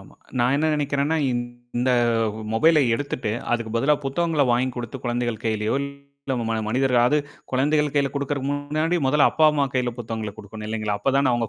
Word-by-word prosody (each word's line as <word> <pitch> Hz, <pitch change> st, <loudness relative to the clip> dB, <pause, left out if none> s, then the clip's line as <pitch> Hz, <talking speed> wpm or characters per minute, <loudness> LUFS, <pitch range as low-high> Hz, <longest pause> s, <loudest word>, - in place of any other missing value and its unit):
ஆமாங்க. -, -, -18 dB, 0.2 s
நான் 125 Hz, +2 st, +3 dB
என்ன 155 Hz, +2 st, +1 dB
நினைக்கிறேன்னா, 145 Hz, +1 st, 0 dB, 0.6 s
இந்த 125 Hz, +2 st, +1 dB, 0.6 s
மொபைல 155 Hz, +8 st, +5 dB
எடுத்துட்டு, 125 Hz, -4 st, -3 dB, 0.2 s
அதுக்கு 115 Hz, -2 st, -1 dB
பதிலா 150 Hz, +6 st, +3 dB
புத்தகங்கள 155 Hz, +2 st, +1 dB
வாங்கிக் 125 Hz, +1 st, 0 dB
குடுத்து 120 Hz, +2 st, -5 dB
குழந்தைகள் 120 Hz, -2 st, -2 dB
கையிலயோ, 110 Hz, -1 st, 0 dB
இல்ல 140 Hz, -1 st, -7 dB
உங் 115 Hz, -1 st, -2 dB, 0.2 s
மனிதர்களா 125 Hz, 0 st, +3 dB
அது 150 Hz, -, +3 dB, 0.3 s
குழந்தைகள் 150 Hz, +2 st, +2 dB
கையில 140 Hz, -2 st, +2 dB
கொடுக்கறதுக்கு 140 Hz, -1 st, -2 dB
முன்னாடி 155 Hz, +4 st, -1 dB
மொதல 145 Hz, +2 st, +4 dB
அப்பா 160 Hz, -, +2 dB
அம்மா 145 Hz, -2 st, +2 dB
கையில 125 Hz, -1 st, 0 dB
புத்தகங்கள 110 Hz, -2 st, -4 dB
கொடுக்கணும் 105 Hz, +1 st, -8 dB
இல்லைங்களா? 110 Hz, -2 st, -2 dB
அப்ப 135 Hz, -, +1 dB
தான 140 Hz, -2 st, +3 dB
அவங்க 120 Hz, -2 st, 0 dB
130 Hz, 165 wpm, -23 LUFS, 120-145 Hz, 0.6 s, மொபைல